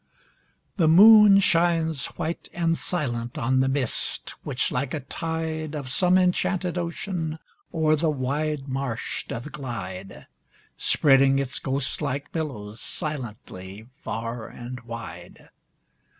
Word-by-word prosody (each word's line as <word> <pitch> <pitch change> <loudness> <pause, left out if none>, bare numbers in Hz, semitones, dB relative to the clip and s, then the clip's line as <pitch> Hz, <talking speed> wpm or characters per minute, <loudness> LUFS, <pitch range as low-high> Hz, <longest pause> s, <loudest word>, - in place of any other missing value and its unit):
The 165 -5 +3
moon 210 +4 +9
shines 165 -5 +2
white 170 0 -4
and 165 -1 +1
silent 120 -10 -2
On 130 +2 +1
the 130 - +3
mist, 135 -3 -1
which, 125 - -1
like 125 +3 -2
a 155 - -4
tide 160 +1 -3
Of 135 -4 -5
some 180 +5 +4
enchanted 180 -1 +1
ocean, 170 -2 -3 0.3
O'er 155 -2 +3
the 160 +1 +1
wide 145 +1 -2
marsh 130 -3 -3
doth 120 +6 -6
glide, 100 -8 -7 0.5
Spreading 135 -2 +4
its 135 -1 -1
ghost 135 +2 -2
like 140 0 -3
billows 115 -10 -5
Silently 110 - -6
far 115 0 -4
and 125 +1 -8
wide. 115 -1 -9
145 Hz, 120 wpm, -25 LUFS, 125-165 Hz, 0.5 s, moon